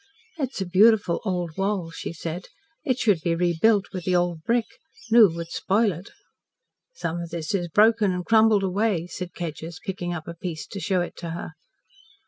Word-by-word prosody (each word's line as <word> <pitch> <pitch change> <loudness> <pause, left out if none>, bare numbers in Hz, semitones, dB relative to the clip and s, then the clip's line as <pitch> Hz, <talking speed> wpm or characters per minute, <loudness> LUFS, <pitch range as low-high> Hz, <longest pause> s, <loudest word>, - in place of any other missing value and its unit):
"It's 270 -5 -3
a 190 - -1
beautiful 200 0 +4
old 175 -5 -2
wall," 195 -4 -1
she - - -6
said. 170 +2 -5 0.4
"It 260 -6 0
should 205 -9 +2
be 165 +1 0
rebuilt 180 +5 +3
with 185 -2 -4
the 185 - +2
old 175 -2 0
brick. 230 +6 +1 0.5
New 225 -3 +8
would 170 0 -6
spoil 210 +2 +2
it." 180 +3 -9 0.9
"Some 170 - -3
of 170 - -6
this 165 0 -4
is 175 -3 0
broken 210 +3 +4
and 180 -1 -3
crumbled 220 -2 +4
away," 190 -2 0
said 180 0 -7
Kedgers, 165 0 -6
picking 180 -2 -3
up 160 -3 -5
a 170 - -5
piece 170 -2 -6
to 200 - -7
show 190 -2 0
it 175 - -5
to 170 - -6
her. 170 +1 -5
180 Hz, 185 wpm, -25 LUFS, 170-210 Hz, 0.9 s, New